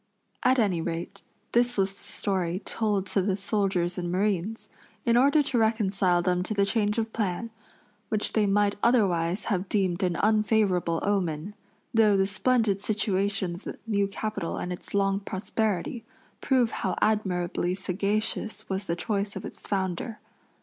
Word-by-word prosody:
At 260 +1 +4
any 195 -8 +2
rate, 165 +1 -4 0.3
this 245 0 +2
was 195 0 +1
the - - -22
story 185 -3 -1
told 205 -4 0
to 195 0 +1
the 190 0 0
soldiers 190 -3 0
and 175 -1 -3
marines, 200 +2 -1 0.4
in 235 - +3
order 285 +5 +5
to 265 -4 0
reconcile 195 -5 +2
them 180 0 +1
to 215 +4 -2
the 200 -1 +3
change 210 0 +1
of 225 -1 -1
plan, 215 +1 -2 0.6
which 215 -1 -1
they 215 -2 +3
might 205 0 +2
otherwise 190 -6 +2
have 190 -3 -1
deemed 190 -3 +1
an 180 -2 +1
unfavorable 210 -5 +2
omen, 190 -2 -1 0.4
though 215 -3 +5
the 195 - +3
splendid 205 0 +1
situation 200 -3 0
of 175 - -9
the - - -6
new 200 -3 +1
capital 200 -3 -3
and 180 - -3
its 180 - -8
long 195 0 +2
prosperity, 205 +2 -2 0.4
prove 255 -4 +2
how - - -2
admirably 180 -4 0
sagacious 200 +3 -2
was 190 +1 -3
the 170 - -1
choice 200 +1 -2
of - - -5
its - - -9
founder. 190 +3 -2
200 Hz, 155 wpm, -27 LUFS, 185-215 Hz, 0.6 s, order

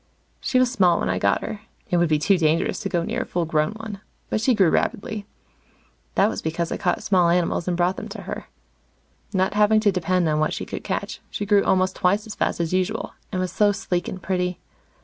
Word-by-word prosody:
She 255 - 0
was 255 -1 +3
small 180 -8 +3
when - - -1
I 90 - -1
got 100 +1 +2
her 215 - -5 0.3
it 175 - +3
would 175 -1 +3
be 155 - +3
too 195 +7 +3
dangerous 165 0 +1
to 205 -3 -3
go 175 -3 0
near - - -2
a - - -3
full 175 -1 -1
grown 155 +2 +1
one 215 -2 -8 0.3
but 215 - 0
she 255 +1 +3
grew 190 -6 +4
rapidly. 205 0 -1 0.9
That 195 - +5
was - - -3
because 165 +1 -2
I - - -1
caught 180 - 0
small 180 -3 +3
animals 170 0 +1
and 175 -1 0
brought 180 +2 +1
them - - -5
to - - -8
her. - - -6 0.8
Not 190 -1 +1
having 210 +1 +4
to 210 -2 +4
depend 180 -1 +1
on 155 -1 +1
what 155 - +1
she - - -4
could - - -6
catch, - - -3
she 205 - -4
grew 205 -1 +4
almost 185 0 +2
twice 200 +4 +1
as 220 - -6
fast - - -1
as 170 0 -1
usual, 185 +4 -1 0.2
and 185 - -2
was 185 -1 -1
so 205 +2 +3
sleek 190 -4 -2
and 190 - -5
pretty. 180 -1 -1
185 Hz, 230 wpm, -23 LUFS, 170-205 Hz, 0.9 s, That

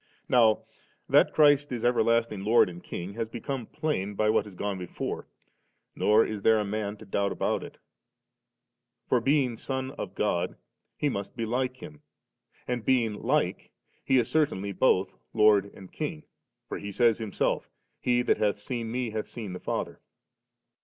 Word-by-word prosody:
Now 115 -4 +4 0.4
that - - +5
Christ 145 -2 +4
is 120 -2 -2
everlasting 115 -4 +2
Lord 110 -1 +5
and 85 0 -10
King, 90 +3 -6
has 115 +1 -3
become 125 +1 -5
plain 105 -10 -2
by 105 +1 +2
what 105 - +2
has 100 -3 -11
gone 100 0 -3
before^ 90 - -5 0.7
nor 110 +2 +4
is 105 -2 -4
there 110 +2 +5
a 105 - -1
man 105 0 -3
to 110 - -12
doubt 100 0 0
about - - -1
it; - - -10 1.3
for 125 - +2
being 135 -3 +2
Son 130 +1 -3
of 100 -9 -7
God, 90 -4 0 0.4
He 150 - 0
must 100 -8 -3
be 115 -1 -2
like 125 +2 -1
Him*, 75 -1 -10 0.7
and 120 -2 -2
being 120 -4 +2
like, - - 0 0.3
He 130 - +3
is 120 -3 +2
certainly 100 -11 0
bodi 95 -4 +3 0.2
Lord 105 -2 +5
and 95 -2 -13
King, 75 - -4 0.4
for - - -5
He 100 - -6
says 115 +1 +3
Himself, 110 -3 -1 0.3
'He 125 0 +2
that - - +2
hath 105 -1 +1
seen 115 +1 -4
Me, 125 -1 -2
hath 110 0 -3
seen 105 -6 -7
the 90 - -6
Father.' - - -4
110 Hz, 165 wpm, -28 LUFS, 100-125 Hz, 1.3 s, that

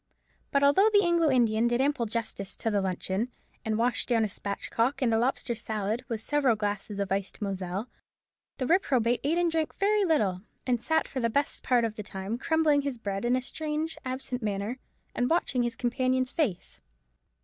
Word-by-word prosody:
But 280 0 +2
although 335 +10 +6
the 410 -1 +5
Anglo 340 -2 +3
Indian 235 -3 +3
did 240 +1 +1
ample 270 -3 +1
justice 215 -3 -3
to 225 - -2
the 205 -1 +2
luncheon, 190 +5 -2 0.3
and 220 -1 -1
washed 235 +2 +1
down 230 -2 +3
a - - +1
spatchcock 230 +6 -2
and 245 -5 +2
a - - +4
lobster 245 0 0
salad 220 0 -3
with 225 -2 -3
several 275 -2 +2
glasses 205 -1 -3
of 200 -1 -2
iced 195 0 -2
Moselle, 195 +1 -3 0.7
the 260 - -1
reprobate 250 - +2
ate 310 +5 +1
and 345 -1 +2
drank 320 -1 -1
very 415 +1 +3
little, 210 - +1 0.2
and 245 -3 +1
sat 320 +4 +1
for 265 - -4
the 230 -2 +1
best 285 +5 0
part 245 -3 +3
of 225 - -2
the 215 - -6
time 200 +2 -5
crumbling 310 -1 +3
his 275 -3 -3
bread 200 -1 -3
in 245 +1 +3
a 255 - -1
strange 310 +3 -3
absent 255 -1 -4
manner, 210 +3 -2 0.3
and 245 - 0
watching 320 -7 +1
his 240 -1 -1
companion's 255 +1 0
face. 200 - -2
240 Hz, 190 wpm, -28 LUFS, 215-285 Hz, 0.7 s, although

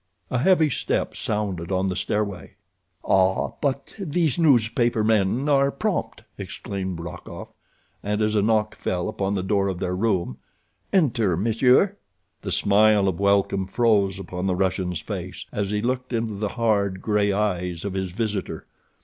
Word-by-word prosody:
A 125 - +1
heavy 160 0 +4
step - - -1
sounded 100 -5 -3
on 95 0 +1
the 95 -1 -1
stairway. 100 -2 -3 0.5
"Ah, 95 0 +2
but 140 -1 -2
these 170 -3 0
newspaper 120 -6 +3
men 110 +5 +2
are 140 -1 +4
prompt," - - -3 0.2
exclaimed 95 -3 -5
Rokoff, 85 +1 -8 0.5
and 105 +1 -2
as 110 0 +1
a 105 - +3
knock 110 0 +1
fell 90 -1 -2
upon 100 +1 -2
the 95 - -1
door 100 0 +1
of 95 -2 -2
their 90 0 -2
room: 95 - -1 0.5
"Enter, 115 - +2
monsieur." 125 - +3 0.4
The - - -5
smile 105 0 +4
of 95 -2 -1
welcome 100 -1 +2
froze 100 -3 +2
upon 95 -1 -4
the 95 - +1
Russian's 90 -2 -1
face - - -6
as 100 -2 -2
he 105 +1 -1
looked 125 +1 -2
into 115 -2 -1
the 100 +1 -2
hard, 100 -5 +1
gray 105 -1 +2
eyes 90 -4 -1
of 100 - -3
his 95 -1 -2
visitor. 105 +1 -3
105 Hz, 155 wpm, -24 LUFS, 95-115 Hz, 0.5 s, heavy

